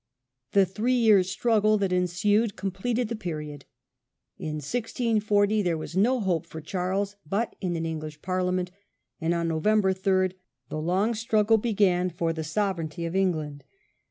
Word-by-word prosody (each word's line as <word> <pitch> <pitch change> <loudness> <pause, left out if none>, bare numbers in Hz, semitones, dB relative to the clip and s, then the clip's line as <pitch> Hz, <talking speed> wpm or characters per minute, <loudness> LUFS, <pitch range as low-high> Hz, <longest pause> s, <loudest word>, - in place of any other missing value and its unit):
The 195 -1 +5
three 220 +7 0
years' 210 -6 +4
struggle 215 0 +2
that 195 -2 0
ensued 195 +5 +1
completed 200 +6 -2
the 230 - -3
period. 150 -7 -6 0.7
In 155 -1 -4
1640 215 - +1
there 175 -4 0
was 155 +2 -7
no 240 +7 +3
hope 180 -7 -1
for 160 - -8
Charles 190 +4 -2
but 200 +9 -2
in 180 -3 -1
an 165 0 -2
English 155 -2 -5
Parliament, 185 -1 -1 0.5
and 165 -1 0
on 170 0 0
Nov. 160 -1 -2
3 190 -3 +2 0.4
the 155 - -3
long 190 +8 +1
struggle 220 0 +2
began 195 -5 +2
for 165 -1 -1
the 160 -1 -4
sovereignty 170 -2 -2
of 165 +2 -4
England. 155 -7 -1
190 Hz, 150 wpm, -26 LUFS, 165-210 Hz, 0.7 s, The